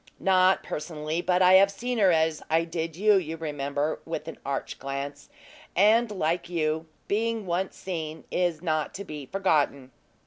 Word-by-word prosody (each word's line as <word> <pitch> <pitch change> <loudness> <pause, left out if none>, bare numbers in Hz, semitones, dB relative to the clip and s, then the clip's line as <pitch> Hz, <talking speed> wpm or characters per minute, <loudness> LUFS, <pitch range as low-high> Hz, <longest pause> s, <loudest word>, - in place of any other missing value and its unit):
"Not 185 0 +4
personally; 155 +1 -3
but 180 +1 +2
I 180 0 +7
have 195 +1 +7
seen 240 +4 -3
her 195 -3 +5
as 160 -1 +1
I 165 +1 +3
did 165 -1 -4
you, 205 +3 +4
you 165 -3 -3
remember," 145 -1 -2
with 165 -1 -5
an 165 - -7
arch 140 0 -4
glance; 140 +1 -5 0.5
"and, 220 +5 +5
like 175 -3 -1
you, 160 -1 -1 0.2
being 225 +1 0
once 185 +2 -2
seen, 160 -4 -5
is 175 -2 0
not 155 -3 -1
to 200 - -5
be 150 -7 -8
forgotten." 145 -8 0
165 Hz, 165 wpm, -27 LUFS, 155-190 Hz, 0.5 s, I